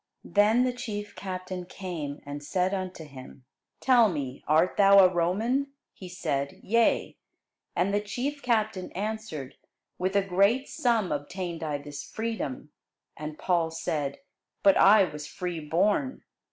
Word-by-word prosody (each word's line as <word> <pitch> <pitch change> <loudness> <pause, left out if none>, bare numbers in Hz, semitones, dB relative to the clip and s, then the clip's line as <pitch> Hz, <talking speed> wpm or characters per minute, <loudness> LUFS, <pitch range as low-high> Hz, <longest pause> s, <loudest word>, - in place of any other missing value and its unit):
Then 215 +4 +4
the 255 -1 0
chief 210 -4 -6
captain 185 -1 -5
came, 165 -7 -6
and 145 +1 -6
said 180 +5 0
unto 185 -4 -4
him, 130 -2 -12 0.3
Tell 245 -4 +5
me, 140 -6 -5
art 160 +4 +3
thou 200 -1 +6
a 185 -2 +7
Roman? 225 +11 0 0.2
He 185 - -10
said, 140 -6 -3
Yea. 230 +2 +2 0.6
And 190 +3 +1
the 205 - +2
chief 265 +8 -3
captain 220 -6 0
answered, 200 -10 -5 0.4
With 185 +2 -1
a 200 - +4
great 200 +8 +2
sum 235 - +1
obtained 170 +3 -4
I 150 -2 -2
this 145 0 -8
freedom. 210 - -4 0.4
And 155 0 -7
Paul 170 -3 +1
said, 150 -3 -3 0.5
But 195 -1 +6
I 200 +1 +7
was 150 -4 -5
free 180 -2 -4
born. 200 - 0
185 Hz, 140 wpm, -28 LUFS, 155-215 Hz, 0.6 s, a